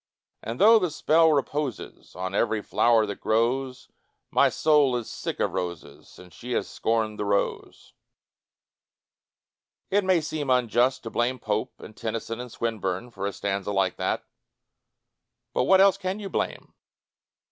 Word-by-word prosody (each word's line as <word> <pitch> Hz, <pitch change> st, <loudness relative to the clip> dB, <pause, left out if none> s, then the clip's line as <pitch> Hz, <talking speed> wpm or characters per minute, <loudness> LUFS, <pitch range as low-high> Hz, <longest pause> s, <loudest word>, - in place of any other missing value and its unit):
And 115 Hz, +2 st, -6 dB
though 225 Hz, +2 st, +7 dB
the 180 Hz, -4 st, 0 dB
spell 160 Hz, +1 st, +3 dB
reposes 145 Hz, -3 st, -3 dB
On 95 Hz, +1 st, -4 dB
every 110 Hz, +1 st, +1 dB
flower 115 Hz, -2 st, +3 dB
that 100 Hz, -1 st, -7 dB
grows, 125 Hz, +4 st, 0 dB, 0.4 s
My -, -, +4 dB
soul 150 Hz, -5 st, +3 dB
is 120 Hz, -2 st, -3 dB
sick -, -, -5 dB
of -, -, 0 dB
roses 85 Hz, -3 st, -5 dB
Since 90 Hz, -1 st, -15 dB
she 125 Hz, +1 st, -6 dB
has -, -, -1 dB
scorned 110 Hz, -2 st, -1 dB
the 105 Hz, -, -1 dB
rose. 100 Hz, 0 st, -2 dB, 2.0 s
It 205 Hz, +1 st, +3 dB
may 185 Hz, -2 st, +3 dB
seem 150 Hz, -2 st, -4 dB
unjust 125 Hz, +1 st, +2 dB
to 115 Hz, -, -6 dB
blame 125 Hz, +2 st, 0 dB
Pope 110 Hz, -2 st, -3 dB
and 110 Hz, -, -12 dB
Tennyson 115 Hz, +1 st, -4 dB
and 125 Hz, -1 st, -7 dB
Swinburne 110 Hz, -1 st, -3 dB
for 100 Hz, -3 st, -4 dB
a -, -, -2 dB
stanza 100 Hz, 0 st, -3 dB
like 95 Hz, -2 st, 0 dB
that, -, -, -2 dB, 1.3 s
but -, -, +1 dB
what 190 Hz, 0 st, +5 dB
else 195 Hz, 0 st, +5 dB
can 190 Hz, +1 st, -3 dB
you 200 Hz, -2 st, -6 dB
blame? -, -, -3 dB
120 Hz, 150 wpm, -26 LUFS, 105-150 Hz, 2.0 s, though